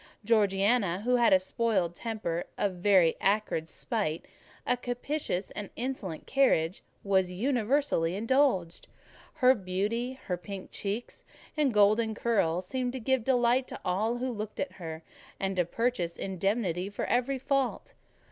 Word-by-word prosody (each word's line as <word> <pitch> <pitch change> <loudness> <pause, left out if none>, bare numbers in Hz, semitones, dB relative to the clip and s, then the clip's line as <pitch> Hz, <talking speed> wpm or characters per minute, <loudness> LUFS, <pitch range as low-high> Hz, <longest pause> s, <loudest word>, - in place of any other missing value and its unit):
Georgiana, 200 -2 +2
who 250 +3 +2
had 240 - +4
a 190 - +7
spoiled 190 -3 0
temper, 195 -5 -3
a - - +2
very 185 -2 +3
acrid 195 -5 +1
spite, 170 -4 -2 0.4
a - - +2
captious 245 -4 -3
and 210 -2 -6
insolent 230 -10 -4
carriage, 195 -11 +2 0.2
was 190 -2 +2
universally 235 - +1
indulged. 225 -6 +1 0.5
Her 260 -4 +6
beauty, 210 +5 -2
her 180 - -1
pink 190 +1 -8
cheeks 210 +4 -5 0.3
and 295 -4 +2
golden 215 +1 +3
curls, 185 -7 +1
seemed 250 +4 -2
to 260 - -4
give 260 +1 +1
delight 250 0 +2
to - - -7
all 215 +6 0
who 255 +1 -2
looked 215 -2 -6
at 285 - -2
her, 160 -3 -8 0.4
and 195 0 -1
to 180 - +3
purchase 180 -4 -1
indemnity 190 -1 -1
for 205 - -4
every 250 +3 +1
fault. 270 -1 -1
210 Hz, 140 wpm, -29 LUFS, 185-245 Hz, 0.5 s, a